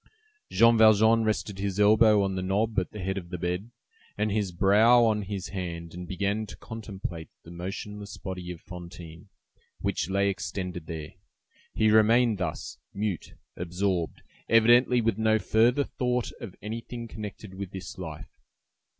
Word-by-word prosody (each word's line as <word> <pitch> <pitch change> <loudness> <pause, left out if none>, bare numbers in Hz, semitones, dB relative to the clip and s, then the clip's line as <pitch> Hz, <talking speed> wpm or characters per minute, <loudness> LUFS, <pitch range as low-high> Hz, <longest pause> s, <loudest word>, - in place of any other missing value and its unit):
Jean 115 -1 +5
Valjean 110 +1 +6
rested 105 -2 -1
his 100 0 -2
elbow 105 0 +6
on 95 -1 -1
the 95 - -2
knob 100 +3 +1
at 90 - -4
the - - -10
head 95 +1 -1
of 85 -2 -12
the 90 - -4
bed, 90 +6 -3 0.5
and 105 0 0
his 100 -3 0
brow 110 +7 +5
on 110 -2 +2
his 100 -1 -5
hand, 85 -4 -5
and 90 0 -7
began 100 +4 -1
to - - -10
contemplate 95 -7 -7
the 85 - -12
motionless 100 +3 -6
body 90 -2 -6
of 90 -2 -6
Fantine, 85 +1 -10 0.5
which 80 - -1
lay 100 +1 +2
extended 95 -3 -4
there. 80 -2 -6 0.6
He 110 -1 +3
remained 110 0 +4
thus, 85 -5 -4 0.2
mute, 100 -4 -3 0.2
absorbed, 90 0 -2 0.3
evidently 120 +2 +5
with 115 -2 0
no 110 0 +3
further 115 +6 +3
thought 125 -3 -2
of 110 -7 -8
anything 115 +2 -6
connected 105 -2 -8
with 95 0 -6
this 90 -5 -8
life. - - -8
100 Hz, 155 wpm, -27 LUFS, 90-110 Hz, 0.6 s, Valjean